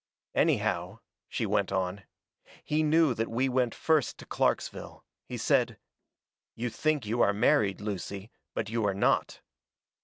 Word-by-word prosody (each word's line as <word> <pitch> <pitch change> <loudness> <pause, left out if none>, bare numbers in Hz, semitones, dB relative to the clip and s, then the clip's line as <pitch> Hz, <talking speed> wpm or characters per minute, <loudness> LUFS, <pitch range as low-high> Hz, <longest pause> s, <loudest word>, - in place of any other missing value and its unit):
"Anyhow," - - +1 0.3
she - - -1
went 100 -1 +1
on, 95 0 -2 0.6
"he 150 +1 +1
knew 155 -2 +4
that 115 0 -2
we 125 +4 +1
went 125 -2 +1
first 155 -4 +1
to - - -11
Clarksville. - - -2 0.2
He - - -5
said: - - +2 0.8
"'You 120 +1 -3
think 155 -3 0
you 115 +3 0
are 100 - +4
married, 100 -2 +3
Lucy, 100 0 -5 0.2
but 105 - -2
you 115 +1 -1
are 100 - 0
not.' 100 - +1
115 Hz, 145 wpm, -29 LUFS, 100-130 Hz, 0.8 s, knew